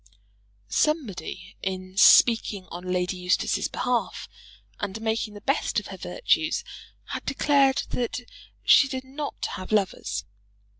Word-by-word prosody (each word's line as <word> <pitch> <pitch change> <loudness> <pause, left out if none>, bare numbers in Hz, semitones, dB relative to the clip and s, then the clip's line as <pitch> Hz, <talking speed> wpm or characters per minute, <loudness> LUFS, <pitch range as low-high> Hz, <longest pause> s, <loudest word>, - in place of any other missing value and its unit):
Somebody, 280 - -2
in 185 -1 -4
speaking 210 -2 +5
on 180 +1 -5
Lady 180 0 -1
Eustace's 180 0 +1
behalf, 245 -2 -2 0.5
and 205 +1 -4
making 220 -1 -2
the 205 - -10
best 275 +7 0
of - - -12
her - - -7
virtues, - - 0 0.5
had - - -4
declared 275 0 +3
that 245 0 -2 0.4
she 280 - +7
did 260 -1 -4
not 280 +3 -5
have 185 - -8
lovers. 190 - 0
220 Hz, 120 wpm, -26 LUFS, 185-265 Hz, 0.5 s, she